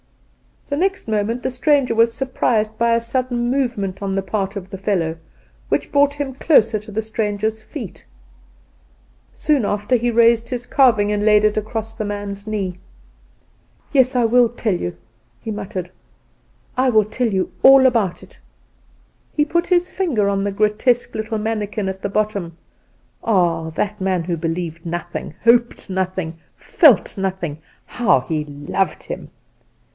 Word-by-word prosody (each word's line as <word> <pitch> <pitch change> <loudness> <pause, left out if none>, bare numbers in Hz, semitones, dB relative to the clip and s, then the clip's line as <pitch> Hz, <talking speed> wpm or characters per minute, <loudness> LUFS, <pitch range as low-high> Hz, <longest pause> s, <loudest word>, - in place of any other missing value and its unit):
The 285 - -2
next 385 0 -1
moment 220 +3 -1
the - - -1
stranger 275 -1 +2
was 230 0 +4
surprised 230 -4 0
by 235 0 +3
a - - +2
sudden 240 0 -1
movement 235 -8 -1
on 195 -1 -2
the 195 - -1
part 195 0 -2
of 190 -2 -6
the 195 - -7
fellow, 175 -5 -1 0.5
which - - -1
brought 285 0 +4
him 285 -2 -4
close 255 -5 +4
to 215 -1 -4
the 215 +2 -1
stranger's 220 0 -2
feet. 230 - -8 1.3
Soon 290 -5 +1
after 210 +5 +1
he 240 +1 0
raised 230 0 +3
his 245 -1 -4
carving 225 -8 +3
and 205 0 0
laid 210 0 +5
it 215 0 +3
across 220 +1 -3
the 220 -1 -4
man's 205 0 -5
knee. 195 -4 -3 1.1
"Yes, 260 -2 +3
I 245 - +3
will 240 +1 +5
tell 225 -3 -1
you," 90 - -3 0.4
he 220 - -6
muttered; 195 -4 -5 0.9
"I 260 0 +3
will 215 -3 +4
tell 235 +4 -1
you 190 -4 -1
all 270 0 +8
about 225 -8 +1
it." - - -16 0.9
He 295 - +2
put 340 +3 0
his 360 0 +2
finger 260 - 0
on 195 0 0
the 200 - -2
grotesque 215 +4 +1
little 220 +1 -3
mannikin 210 -2 -2
at 190 0 -6
the 200 - -2
bottom 200 -5 -2 0.7
(ah! 170 -6 +1
that 205 +6 -2
man 185 -2 0
who 170 0 -2
believed 165 0 -4
nothing, 170 -2 -5
hoped 235 -3 +2
nothing, 185 -3 -3 0.2
felt 280 - +4
nothing; 185 -6 -3 0.3
how 205 - +2
he 155 +3 -3
loved 145 +6 -2
him!) - - -7
215 Hz, 155 wpm, -20 LUFS, 195-240 Hz, 1.3 s, all